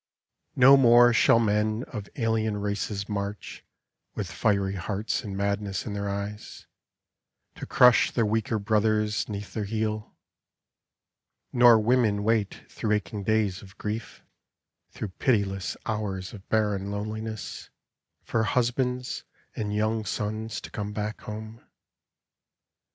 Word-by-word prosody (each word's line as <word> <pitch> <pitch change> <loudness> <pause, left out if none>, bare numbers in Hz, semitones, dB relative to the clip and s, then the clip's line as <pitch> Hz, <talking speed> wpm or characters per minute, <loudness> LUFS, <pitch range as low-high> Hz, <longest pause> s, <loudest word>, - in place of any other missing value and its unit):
No 135 +2 +8
more 120 -2 +7
shall 115 - +5
men 110 +1 +1
of 105 -8 -7
alien 110 -3 0
races 100 0 -3
march 100 0 -5 0.5
With - - -4
fiery 100 -1 +1
hearts 100 +6 -2
and 100 -3 -5
madness 100 -1 -2
in 105 - -4
their 100 0 -3
eyes 100 +1 -6 0.9
To - - -7
crush 125 -2 +6
their 115 - +1
weaker 110 +1 0
brothers 105 -1 +1
'neath 105 -1 -6
their 110 -2 -2
heel; 110 0 -3 1.4
Nor 120 -2 +7
women 110 -2 +2
wait 110 -2 0
through 110 -2 -2
aching 105 0 -2
days 105 -2 0
of 95 -1 -15
grief, 110 +2 -5 0.7
Through 105 - -6
pitiless 100 -6 0
hours 100 -4 -3
of 100 -2 -12
barren 105 -3 0
loneliness 110 +1 -5 0.5
For 115 - 0
husbands 125 +2 -1 0.3
and 105 -1 -3
young 110 +1 0
sons 110 +2 -3
to - - -10
come 105 0 -4
back 105 +1 -4
home. 110 +1 -8
105 Hz, 125 wpm, -27 LUFS, 100-110 Hz, 1.4 s, No